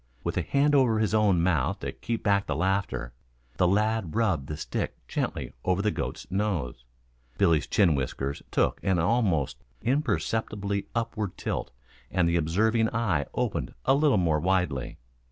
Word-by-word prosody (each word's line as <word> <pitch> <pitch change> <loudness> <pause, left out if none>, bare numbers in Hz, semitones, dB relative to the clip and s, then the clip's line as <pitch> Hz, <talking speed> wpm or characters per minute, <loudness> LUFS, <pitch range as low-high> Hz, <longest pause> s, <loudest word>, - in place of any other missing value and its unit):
With - - -2
a - - +1
hand 145 +1 +2
over 130 -6 +4
his 110 -1 +1
own 100 -6 +3
mouth 90 +2 +1
to - - -3
keep 115 -1 -4
back 100 -1 +2
the - - -1
laughter, 90 -11 -1 0.4
the 90 - +4
lad 105 -2 +1
rubbed 95 -12 +1
the 75 - -5
stick 75 - -3
gently - - -3
over 95 +2 +1
the 105 - +2
goat's - - -4
nose. 90 - -2 0.5
Billy's 85 -7 +3
chin 95 -6 +4
whiskers 70 0 -3
took - - +1
an 95 -2 +1
almost 85 - +1 0.3
imperceptible 110 -6 0 0.2
upward 110 -4 -2
tilt - - -3 0.4
and 90 -3 +2
the 85 - +1
observing 110 +8 +2
eye 105 -11 0
opened - - -2
a - - +5
little 145 -4 +4
more 80 -4 +2
widely. 90 -7 0
95 Hz, 155 wpm, -27 LUFS, 80-110 Hz, 0.5 s, a